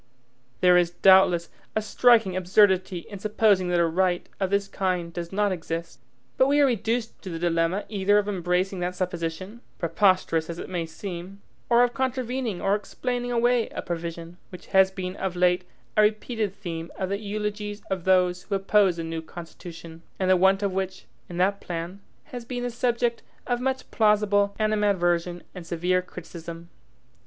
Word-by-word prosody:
There 180 0 +6
is, 175 -1 +2
doubtless, 175 -1 +5 0.3
a 220 - +2
striking 225 -4 +4
absurdity 185 -1 +2
in 200 - -8
supposing 205 -2 +2
that 175 -1 +1
a 170 - +4
right 175 +1 0
of 190 -2 0
this 200 0 +1
kind 180 -4 -2
does 170 -1 -5
not 205 +1 +1
exist, 165 -5 -5 0.4
but 260 - +5
we 285 +1 +3
are 285 - +6
reduced 230 -1 -1
to 190 - -7
the 165 - -4
dilemma 170 +3 0
either 205 0 +2
of 205 0 +1
embracing 185 0 -1
that 180 +1 -2
supposition, 180 +4 -4 0.2
preposterous 170 -2 +2
as 170 - -5
it - - -7
may 170 -3 -2
seem, 185 +3 -8 0.3
or 240 0 +6
of 245 0 +1
contravening 255 -5 -2
or 195 - +1
explaining 245 +4 -3
away 240 0 +2
a - - -6
provision, 170 0 -5
which 180 - -11
has 190 0 +6
been 185 -1 -5
of 190 -2 -3
late 180 0 +2 0.3
a - - +5
repeated 215 -1 0
theme 170 -4 -6
of 190 -1 -2
the 200 +1 -1
eulogies 210 0 -4
of 190 -3 -2
those 180 -1 +3
who 200 - -3
oppose 195 -2 +3
the 165 - -3
new 165 0 -4
Constitution; 165 0 -10 0.2
and 185 -1 +1
the - - +7
want 190 +2 +3
of 200 -2 0
which, 190 0 -3 0.2
in 175 - -7
that 195 +3 +1
plan, 175 +3 -5 0.2
has 250 -5 -8
been 245 +1 -5
the 245 - -2
subject 240 0 0 0.2
of 245 -1 -1
much 260 0 -2
plausible 205 -2 +3
animadversion, 180 -5 +1
and 180 -3 -9
severe 180 +2 +1
criticism. 170 -1 -10
190 Hz, 175 wpm, -25 LUFS, 175-210 Hz, 0.4 s, the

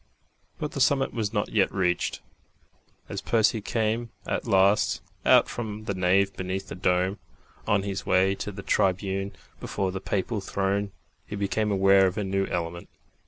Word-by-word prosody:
But 150 - -4
the 140 - -3
summit 135 +1 +3
was 110 -4 -2
not 105 -2 -1
yet 100 -3 +2
reached. 90 -2 0 0.9
As - - -5
Percy 110 -1 +2
came 115 +2 -1 0.2
at - - -2
last 100 0 +3 0.3
out - - +6
from 110 -2 -5
the 100 - -1
nave 95 +1 +2
beneath 95 +1 -4
the - - -5
dome, 90 +1 +1 0.5
on 100 -2 +2
his 100 0 -3
way 95 +1 +3
to 105 - -5
the 100 0 -8
tribune 95 +1 0 0.3
beyond 95 -1 -2
the 95 - -4
papal 100 +2 -2
throne, 100 +1 -1 0.4
he 105 - -5
became 105 +2 0
aware 95 0 +5
of 90 - -3
a 105 - 0
new 95 0 0
element. 85 0 -4
100 Hz, 165 wpm, -26 LUFS, 95-105 Hz, 0.9 s, out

